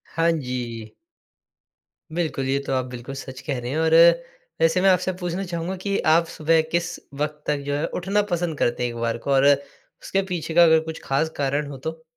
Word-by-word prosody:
हाँ 165 0 +3
जी। 125 -6 -4 1.2
बिल्कुल, 160 -6 -1
ये 135 +1 +1
तो - - -1
आप 130 -1 0
बिल्कुल 125 +3 -7
सच 130 -1 -8
कह 130 - -1
रहे 120 +1 -5
हैं। 155 - -2
और 160 0 +2 0.7
वैसे 165 +3 +3
मैं 195 - +5
आपसे 185 0 +2
पूछना 180 +2 -3
चाहूँगा 170 +2 -3
कि 200 -1 0 0.2
आप 165 +1 +4
सुबह 160 +1 +3
किस 170 +1 0 0.3
वक़्त 150 0 -3
तक 150 -1 +1
जो 145 - -1
है, 150 - -1
उठना 195 +3 0
पसंद 170 -3 -1
करते 120 +1 +1
हैं 120 - 0
एक 120 - -7
बार 115 0 0
को - - +1
और 135 0 +4
उसके 145 +6 0
पीछे 160 -2 -3
का 175 +1 +7
अगर 160 -1 +6
कुछ 160 - -7
ख़ास 140 +4 0
कारण 140 +1 0
हो 135 - -7
तो? 160 +4 -6
155 Hz, 205 wpm, -23 LUFS, 135-170 Hz, 1.2 s, का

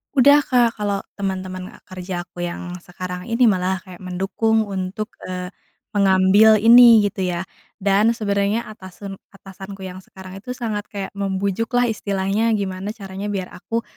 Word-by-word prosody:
Udah 285 +2 +6
Kak. 240 -3 +2
Kalau 205 -2 -1 0.2
teman-teman 185 -2 -4 0.2
kerja 185 -1 -6
aku 175 0 -7
yang 175 +1 -5
sekarang 180 0 -6
ini 240 +1 +4
malah 185 -2 +1
kayak 185 -1 -13
mendukung 205 +4 0
untuk, 195 +2 -4 0.2
eee, 180 0 -5 0.5
mengambil 200 +2 +5
ini, 230 +1 +8
gitu 195 -1 -4
ya. 175 +2 -4 0.3
Dan, 200 +3 +3
sebenarnya 205 0 -1
atasen 195 -1 -9 0.2
atasanku 195 0 -11
yang 185 0 -7
sekarang 190 0 -12
itu, 250 +5 -8
sangat 225 -4 -3
kayak 200 -2 -5
membujuk 200 +2 -1
lah 245 0 +3
istilahnya, 205 +1 0
gimana 190 +1 -4
caranya 195 -1 -7
biar 190 -2 -3
aku 225 +6 -3
195 Hz, 145 wpm, -21 LUFS, 185-215 Hz, 0.5 s, ini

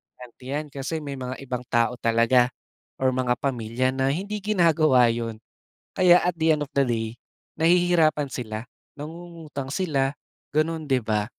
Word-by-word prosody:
tante 125 0 -14
yan, 145 +3 -3
kasi 140 +4 -4
may 140 -2 -6
mga 130 0 -5
ibang 125 -2 -4
tao 120 +1 +1
talaga 115 +2 +3 0.5
or 130 - +4
mga 125 -1 +1
pamilya 125 -1 -1
na 135 +1 +1
hindi 200 +6 -3
ginagawa 160 - +4
yun. 115 -1 -3 0.6
Kaya 180 -1 +6
at 175 -1 0
the 160 0 +3
end 150 - -2
of 140 - -9
the 140 - +4
day 115 -2 -1 0.5
nahihirapan 165 -3 +3
sila, 110 -4 -5 0.4
nangungutang 160 -2 -8
sila, 140 -7 0 0.4
gano'n, 155 +1 0
'di 130 -2 +2
ba? 105 -1 0
135 Hz, 155 wpm, -25 LUFS, 125-160 Hz, 0.6 s, Kaya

